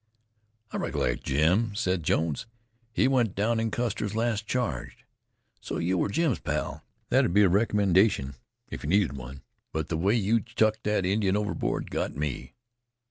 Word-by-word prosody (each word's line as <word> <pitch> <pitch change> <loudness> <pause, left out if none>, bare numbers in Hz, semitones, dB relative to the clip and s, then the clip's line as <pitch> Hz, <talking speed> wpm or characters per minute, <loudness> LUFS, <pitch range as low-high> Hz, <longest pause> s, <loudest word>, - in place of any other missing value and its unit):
"I - - -3
recollect - - -1
Jim," 90 +10 +2
said 95 -5 0
Jones. 80 +3 0 0.4
"He 115 - +2
went 125 -6 +2
down 110 +3 +1
in 115 0 0
Custer's 110 -3 -2
last 110 -2 0
charge. 125 -2 -3 0.5
So - - -5
you 90 +3 0
were 90 - +1
Jim's 150 +2 +1
pal. - - -3 0.3
That'd 85 - +3
be 105 - +7
a 95 - +5
recommendation 100 - +3 0.4
if - - -6
you 75 - -3
needed 95 -7 +2
one. 65 +1 -9 0.3
But 80 -1 -3
the 80 - -1
way 100 +7 +2
you 115 +1 +2
chucked 110 -2 0
the 105 -3 +1
Indian 100 0 +2
overboard 105 -6 -2
got - - -2
me." 70 -4 -4
100 Hz, 160 wpm, -27 LUFS, 85-110 Hz, 0.5 s, be